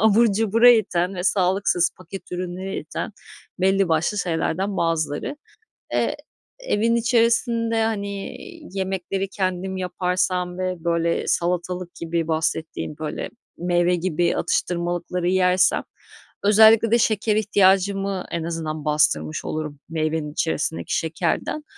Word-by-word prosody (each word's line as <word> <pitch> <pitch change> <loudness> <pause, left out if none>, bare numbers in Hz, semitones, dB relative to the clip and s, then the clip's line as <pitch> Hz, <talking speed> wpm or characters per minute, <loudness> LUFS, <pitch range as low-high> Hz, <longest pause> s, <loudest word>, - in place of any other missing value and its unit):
abur 220 +1 +4
cubura 225 +3 +5
iten 190 -5 +2
ve 180 - -4
sağlıksız, 185 -2 +2
paket 185 +2 -10
ürününe 185 +2 -4
iten 160 +7 -5 0.5
belli 195 0 +3
başlı 165 +6 +1
şeylerden 185 +2 -1
bazıları. 165 - -1 0.6
Eee, - - 0 0.4
evin 230 - +1
içerisinde, 230 -1 +2
hani, 200 -3 -3 0.4
yemekleri 190 +1 -2
kendim 190 -1 -2
yaparsam 180 0 -1
ve, 185 -2 -3
böyle, 170 0 0
salatalık 180 +1 -1
gibi 165 -1 -2
bahsettiğin, 160 -1 -2
böyle, 155 -1 -4 0.3
meyve 175 0 +2
gibi 175 -1 0
atıştırmalıkları 175 0 -1
yersem 185 0 +3 0.6
özellikle 220 +2 +6
de 235 - +4
şeker 215 -1 +1
ihtiyacımı 195 -2 +2
en 170 - -2
azından 160 -2 -4
bastırmış 80 - +1
olurum 150 -2 -4
meyvenin 155 -1 -2
içerisindeki 160 0 -1
şekerden. 170 - -2
180 Hz, 110 wpm, -23 LUFS, 170-200 Hz, 0.6 s, özellikle